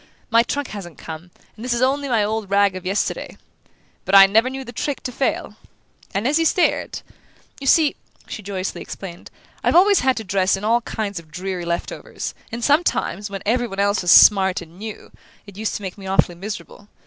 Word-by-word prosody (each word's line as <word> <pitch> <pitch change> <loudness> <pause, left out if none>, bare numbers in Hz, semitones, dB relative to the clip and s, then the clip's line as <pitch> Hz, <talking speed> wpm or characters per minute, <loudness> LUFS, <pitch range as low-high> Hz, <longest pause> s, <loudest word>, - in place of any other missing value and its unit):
My 230 0 +6
trunk 280 +3 -3
hasn't 185 -5 -8
come, 160 +2 -9 0.3
and 220 - -11
this 250 -1 0
is 240 - -2
only 280 +2 +1
my 225 -4 +2
old 215 -1 -2
rag 200 -1 +3
of 185 0 -6
yesterday 195 +2 -2 0.7
but 195 - +1
I 195 0 +11
never 220 +6 +3
knew 265 0 -6
the 240 - -8
trick 285 +3 -3
to 250 - -4
fail!" 265 +2 -2 0.5
And, 200 +5 -1
as 295 +3 +2
he 330 - +2
stared: 350 +2 +1 0.6
"You 275 - -6
see," 305 0 +4 0.3
she - - -7
joyously 190 -2 -4
explained, 175 -3 -9 0.3
"I've - - +2
always 395 +3 +6
had 260 0 +1
to 220 - -3
dress 195 0 +1
in 195 - -9
all 230 +3 +2
kinds 205 -4 -4
of 160 -2 -16
dreary 180 +2 -5
left 170 0 -2
overs, - - -6 0.2
and 235 +1 -5
sometimes, 280 - +1
when 195 -1 -6
everybody 225 -3 0
else 200 0 +1
was 180 - -2
smart 190 0 +7
and 175 +1 -13
new, 215 0 -8 0.3
it 200 -2 -13
used 215 +1 -3
to 205 - -6
make 190 +1 -6
me 190 - -8
awfully 190 -2 +2
miserable. 205 +2 -8
205 Hz, 205 wpm, -21 LUFS, 190-240 Hz, 0.7 s, I